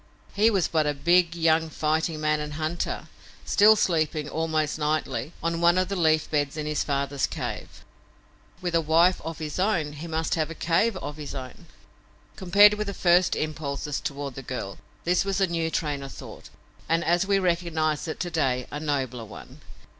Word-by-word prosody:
He 215 +2 +4
was 195 -6 +1
but 155 -2 +1
a 145 - 0
big, 170 +3 +3
young 160 -1 +2
fighting 155 +1 -1
man 155 0 +1
and 150 0 -5
hunter, 155 +3 -3 0.4
still 215 +1 +6
sleeping, 155 -5 0
almost 155 -1 -1
nightly, 150 -2 -1
on 165 0 -1
one 170 +1 +5
of 185 0 +1
the 200 - -2
leaf 160 -3 +2
beds 145 -1 0
in 155 - -3
his 150 0 -1
father's 140 -1 -1
cave. - - -6 0.8
With 175 -1 -2
a 165 - +3
wife 165 +4 +3
of 165 0 -6
his 155 +1 -5
own 175 -7 0
he 150 +3 -7
must 160 0 -1
have 155 -2 0
a 165 - -7
cave 185 +7 +1
of 150 -4 -6
his 150 -2 -7
own. 130 -2 -9 0.7
Compared 200 +3 +6
with 210 0 -3
his 200 - -5
first 175 0 +4
impulses 150 -2 -3
toward 140 -1 -5
the 135 - -7
girl, 120 -7 -6 0.2
this 180 +1 +2
was 195 0 -1
a 195 - +4
new 165 -2 -1
train 150 -3 -2
of 135 0 -7
thought, - - -11 0.4
and, 165 +1 +2
as 175 +3 +2
we 200 -1 +3
recognize 170 -4 0
it 155 - -5
to 175 - -3
day, 130 -6 0
a 145 - -4
nobler 130 -6 -2
one. - - -12
160 Hz, 190 wpm, -26 LUFS, 150-175 Hz, 0.8 s, still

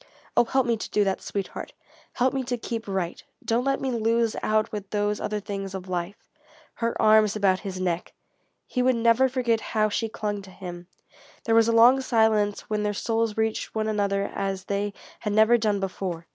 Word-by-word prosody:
"Oh - - +5
help 265 +2 +1
me 235 -1 +1
to - - -6
do 210 - +2
that, 195 -1 -1
sweetheart! 200 -2 -5 0.4
Help 255 +2 +1
me 270 -1 -1
to 245 0 -2
keep 230 -1 -5
right! 190 -3 -3 0.2
Don't 230 +2 +1
let 275 0 +1
me 265 - -2
lose 230 -1 +1
out 215 0 +1
with 205 -2 -6
those 205 0 -1
other 210 0 -2
things 195 -1 -5
of 190 0 -7
life!" 180 +2 -3 0.6
Her 230 0 -2
arms 215 -1 +5
about 195 -3 +2
his 190 -3 -6
neck! 180 -2 -2 0.5
He 250 - -1
would 255 0 +3
never 235 +3 +4
forget 240 -3 0 0.2
how 215 0 +4
she 225 +2 -1
clung 210 -2 -3
to 195 - -13
him. 180 -2 -9 0.6
There 225 - +1
was 225 0 +5
a - - +3
long 240 +4 +6
silence 220 -4 +2
when 215 -1 -2
their 210 0 -1
souls 225 0 -1
reached 220 0 -1
one 215 0 0
another 200 -2 0
as 195 -1 -3
they 200 0 -2 0.3
had 210 -2 -2
never 220 +3 +5
done 215 -3 +1
before. 185 -3 -4
215 Hz, 200 wpm, -25 LUFS, 200-230 Hz, 0.6 s, long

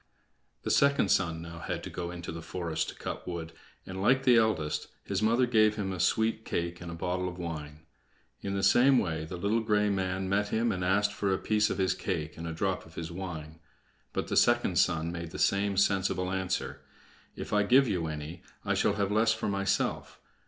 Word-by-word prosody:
The - - -1
second 140 -7 +3
son 80 -1 +1
now 85 0 -8
had - - -4
to - - -7
go 85 -1 -4
into 85 -1 -6
the 85 +1 -6
forest 80 -1 -3
to - - -8
cut - - -6
wood, 85 -2 -5 0.3
and, 95 0 -6
like 130 +6 +3
the 125 -2 +6
eldest, 110 -10 +1 0.2
his - - -2
mother 115 +4 +3
gave 110 -3 +4
him 95 -3 -2
a 90 - -6
sweet 110 +5 +1
cake 85 -2 -3
and 90 - -7
a 85 - -6
bottle 90 +2 -2
of 90 - -9
wine. 75 -3 -6 0.6
In 100 0 -3
the 95 - -1
same 125 +6 +5
way 80 -7 -1
the 90 +3 -6
little 100 +5 +1
gray 105 -2 +2
man 95 -1 -1
met 100 +2 +1
him, 115 +2 +1
and 90 -3 -2
asked 100 +3 +2
for 100 -1 -1
a 95 - +2
piece 105 +1 +1
of - - -2
his 95 -1 +2
cake 80 -5 -3
and 85 0 -6
a - - -3
drop 95 +3 -1
of 80 - -17
his 80 0 -5
wine. 80 -4 -7 0.5
But - - -3
the - - -2
second - - +3
son 80 -1 +1
made 85 -1 -5
the - - -8
same 100 0 +1
sensible 95 -2 +1
answer: 95 -1 -2 0.5
"If - - -6
I 105 - +4
give 130 +6 +5
you 90 -6 -1
any, 80 +3 -6 0.2
I - - +1
shall - - +2
have 100 -1 0
the - - -1
less 110 0 +4
for 110 - -3
myself. 100 0 -1
95 Hz, 215 wpm, -29 LUFS, 85-105 Hz, 0.6 s, the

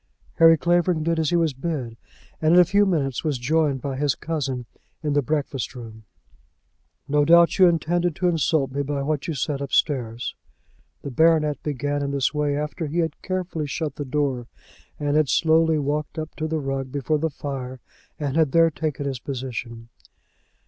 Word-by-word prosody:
Harry 165 0 +8
Clavering 175 0 +1
did 165 0 0
as 160 - +1
he 175 - +1
was 165 -4 +2
bid, 135 -5 -4 0.5
and 160 +2 +4
in - - +8
a 180 - +7
few 200 +3 +3
minutes 140 -8 -1
was 150 -4 0
joined 140 +1 0
by 140 -2 -3
his 140 0 0
cousin 135 -6 -3 0.4
in 150 -2 0
the 145 - +3
breakfast 140 -2 -2
room. 110 -3 -10 1.0
"No 145 0 +3
doubt 170 +4 +5
you 185 - +8
intended 175 0 +1
to 180 - 0
insult 155 -4 +1
me 140 +2 -2
by 140 0 -2
what 150 0 -2
you 165 - -2
said 140 +1 -2
upstairs." 125 -4 -1 0.7
The 140 - -5
baronet 155 0 +3
began 145 0 -2
in 140 - -2
this 140 0 0
way 145 -1 0
after 150 +2 -3
he 155 +4 -4
had 160 -3 -1
carefully 180 -5 -3
shut 150 0 -4
the 145 - -3
door, 130 -3 -1 0.5
and 145 0 0
had 155 -3 +3
slowly 160 0 +3
walked 150 +2 -2
up 155 0 -5
to 155 - -2
the 160 0 -1
rug 135 -2 -3
before 145 +2 -1
the 160 +2 0
fire, 135 -3 -6 0.4
and 145 -2 -2
had 160 -4 +2
there 165 0 +5
taken 145 -2 -3
his 135 -3 -3
position. 120 -3 -6
150 Hz, 185 wpm, -23 LUFS, 135-160 Hz, 1.0 s, Harry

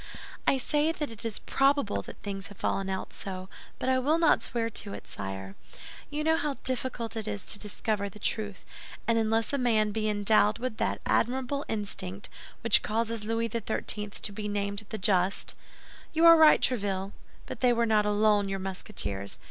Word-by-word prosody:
"I 270 - +5
say 295 +4 +1
that 300 -5 -4
it 225 - -9
is 225 -2 -2
probable 275 -5 +1
that - - -10
things 195 -1 -4
have 205 - -13
fallen 195 0 -1
out 190 0 -4
so, 185 -1 -6 0.3
but - - -3
I 260 0 +3
will 295 +5 +2
not 330 -2 +4
swear 230 -1 -2
to 205 -2 -4
it, - - -8
sire. 95 -1 -6 0.6
You 300 +1 -2
know 320 +1 +3
how 290 -2 -1
difficult 250 -3 -2
it 220 -1 -4
is 205 -2 -3
to 205 - -2
discover 210 -1 -2
the 200 - -13
truth; 210 -1 -3 0.4
and 230 -1 +3
unless 225 +2 +1
a 280 - +1
man 220 -4 +2
be 215 0 -1
endowed 210 0 +3
with 235 -2 -4
that - - -1
admirable 265 +4 +1
instinct 200 -2 -3 0.3
which 230 -2 +5
causes 225 0 -1
Louis 225 +1 0
XIII. 210 -2 -2
to 205 - -2
be 210 +1 -5
named 200 0 -3
the 220 - -4
Just—" 190 -1 +2 0.6
"You 325 +1 +4
are 335 0 +11
right, 315 -1 +7
Tréville; 200 -5 0 0.3
but - - -7
they 250 -1 +4
were 235 0 +2
not 215 -2 +3
alone, 210 -1 +3
your 195 - -1
Musketeers. 185 - -4
215 Hz, 185 wpm, -29 LUFS, 200-245 Hz, 0.6 s, are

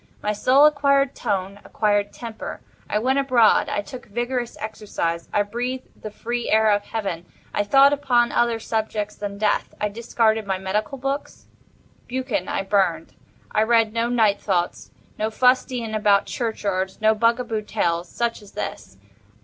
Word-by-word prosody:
My 210 - 0
soul 260 +7 +5
acquired 280 -2 +3
tone—acquired 205 +1 -1
temper. 230 -2 -7 0.3
I - - +1
went 260 +5 +1
abroad. 255 -5 +4
I 205 - -1
took 245 +5 -10
vigorous 240 +2 -3
exercise. 205 -6 -3
I 205 - +2
breathed 245 +5 -5
the 215 - -5
free 240 +3 -4
air 220 0 +4
of 205 0 +1
Heaven. 195 -6 -4 0.3
I 205 - +1
thought 275 +6 +6
upon 250 -4 +2
other 235 -1 +2
subjects 215 -2 -2
than 200 -1 -5
Death. 210 0 0
I 210 - 0
discarded 220 0 0
my 190 -1 0
medical 210 +8 -2
books. 275 +2 -4 0.6
"Buchan" 255 -7 -2
I - - -1
burned. 190 -5 0 0.4
I 215 - +2
read 225 -1 +3
no 230 +1 0
"Night 220 -4 +2
Thoughts"—no 190 +3 -3
fustian 250 -1 +1
about 205 -2 +3
churchyards—no 210 -2 -1
bugaboo 230 0 +1
tales—such 205 +3 -2
as 205 - -16
this. 95 - -6
220 Hz, 140 wpm, -23 LUFS, 205-245 Hz, 0.6 s, thought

